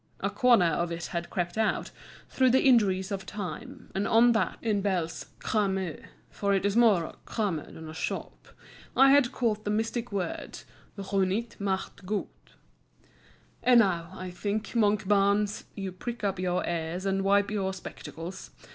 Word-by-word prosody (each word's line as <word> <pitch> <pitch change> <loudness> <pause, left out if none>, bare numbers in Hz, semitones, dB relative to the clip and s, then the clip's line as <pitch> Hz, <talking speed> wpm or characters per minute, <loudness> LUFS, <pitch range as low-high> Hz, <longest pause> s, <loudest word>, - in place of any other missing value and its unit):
A 200 - -1
corner 230 -2 +5
of 170 +1 0
it 170 0 -4
had 170 0 -3
crept 175 +3 -2
out, 220 - 0 0.4
through 260 -1 +3
the 260 +2 +4
injuries 200 -6 +4
of 195 -1 -3
time, 200 -4 -7
and 195 +1 -1
on 235 +2 +6
that, 220 -5 0
in 210 -3 0
Bell's 180 -5 -2
"crame" 190 -6 -1 0.3
(for 200 -1 0
it 195 - 0
is 200 0 +1
more 220 -7 +5
a - - -8
crame 205 -7 -1
than 160 0 -9
a 155 - -8
shop), 175 - -5 0.5
I 270 +1 +7
had 275 -3 +5
caught 215 -4 -1
the 205 - -3
mystic 225 +2 -1
words 190 -4 -4 0.3
Runjt 195 +3 -1
macht 195 -1 -3
Gunjt. 210 0 -5 1.1
And 245 -2 +6
now, 170 -5 0
I 185 -1 -6
think, 205 +4 -3
Monkbarns, 205 -1 +2
you 195 -2 -4
prick 230 +5 -6
up 195 -2 0
your 180 -1 0
ears 170 +2 -3
and 195 0 +1
wipe 200 +1 +3
your 195 -2 -1
spectacles. 185 -1 -8
200 Hz, 160 wpm, -28 LUFS, 185-215 Hz, 1.1 s, I